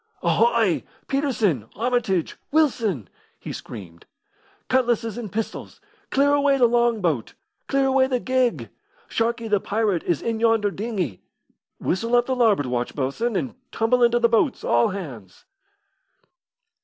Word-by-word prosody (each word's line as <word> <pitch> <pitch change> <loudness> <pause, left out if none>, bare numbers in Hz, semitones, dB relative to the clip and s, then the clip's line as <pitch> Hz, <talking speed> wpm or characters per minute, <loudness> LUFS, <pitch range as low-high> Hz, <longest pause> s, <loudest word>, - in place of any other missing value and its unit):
"Ahoy! 475 - +2 0.2
Peterson, 225 - 0
Armitage, 225 -6 0 0.2
Wilson!" 230 - +1 0.3
he - - -7
screamed. 90 -7 -10 0.6
"Cutlasses 240 -4 +1
and 225 -5 -6
pistols! 225 0 -5 0.3
Clear 285 +1 +3
away 285 -1 +3
the 250 - +5
long 235 -2 +2
boat! 150 - -1 0.3
Clear 275 0 +2
away 265 0 +3
the 255 -2 0
gig! 255 -1 0 0.4
Sharkey, 230 0 -1
the 210 -2 +2
pirate, 205 -4 0
is 170 -4 -1
in 230 -1 -1
yonder 225 -3 +2
dinghy. 190 - -3 0.6
Whistle 230 +6 0
up 240 0 +4
the 260 - -1
larboard 220 - +3
watch, 125 -1 -2
bo'sun, 150 - -1
and 240 +6 -2 0.2
tumble 235 +2 +1
into 240 0 +4
the 240 -1 +4
boats, 235 +4 +1
all 120 0 +3
hands." 130 - -8
230 Hz, 135 wpm, -23 LUFS, 185-250 Hz, 0.6 s, the